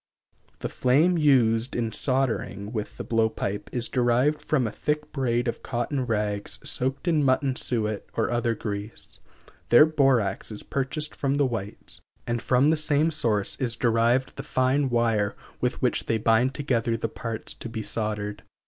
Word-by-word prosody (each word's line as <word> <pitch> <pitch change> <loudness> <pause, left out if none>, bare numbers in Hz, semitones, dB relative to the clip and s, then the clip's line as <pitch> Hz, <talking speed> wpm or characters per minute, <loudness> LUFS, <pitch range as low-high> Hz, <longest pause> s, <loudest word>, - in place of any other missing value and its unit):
The - - -1
flame 150 +8 +3
used 125 -5 +3
in 115 -2 -1
soldering 115 -6 -1
with 105 -3 -5
the - - -4
blow 115 -1 +2
pipe 105 -2 -4
is 120 -1 -1
derived 125 +4 +2
from 135 -5 +1
a 110 - -2
thick 150 +5 -2
braid 120 -3 0
of 120 - -3
cotton 125 +1 -2
rags 105 -2 -1
soaked 135 +5 -1
in 160 -4 +3
mutton 130 0 +2
suet 110 -5 -1
or 110 0 0
other 120 -1 0
grease. 105 0 -6 0.5
Their 120 +6 +8
borax 135 -11 +1
is 105 - -8
purchased 140 +3 -3
from 140 0 0
the 145 -1 +3
whites, 110 -5 -5 0.2
and 120 -1 -1
from 130 +4 +3
the 160 - +3
same 155 +1 +2
source 110 -9 +1
is 120 -3 +1
derived 120 +2 +2
the - - -3
fine 130 +2 +1
wire 115 -4 +1 0.2
with - - -2
which - - +1
they 115 - +2
bind 115 +5 +2
together 120 -5 0
the 115 - -2
parts 115 0 -6
to 120 - -8
be 110 -1 -4
soldered. 105 -2 -3
120 Hz, 165 wpm, -26 LUFS, 110-135 Hz, 0.5 s, Their